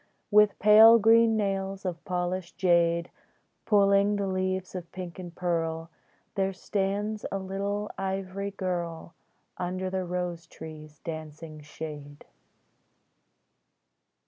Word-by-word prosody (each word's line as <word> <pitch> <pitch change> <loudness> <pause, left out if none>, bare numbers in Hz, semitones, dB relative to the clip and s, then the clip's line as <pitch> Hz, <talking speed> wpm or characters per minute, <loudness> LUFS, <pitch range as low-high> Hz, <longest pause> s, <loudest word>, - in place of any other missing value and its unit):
With 210 -1 +5
pale 220 +2 +8
green 225 0 +5
nails 195 -1 -2
of 175 -2 -4
polished 180 -1 -3
jade, 170 -2 +2 0.6
Pulling 200 -1 +4
the 200 -1 -1
leaves 185 -1 -2
of 180 -2 -7
pink 180 -1 -7
and 175 -2 -8
pearl, 165 -2 -2 0.4
There 195 -1 0
stands 205 +3 -2
a 195 - -1
little 200 +2 -3
ivory 195 +1 -3
girl 175 -4 -4 0.5
Under 185 +1 -3
the 190 0 -1
rose 175 -2 -4
tree's 155 -2 -11
dancing 155 -1 -7
shade. 150 -1 -9
185 Hz, 110 wpm, -28 LUFS, 170-200 Hz, 0.6 s, pale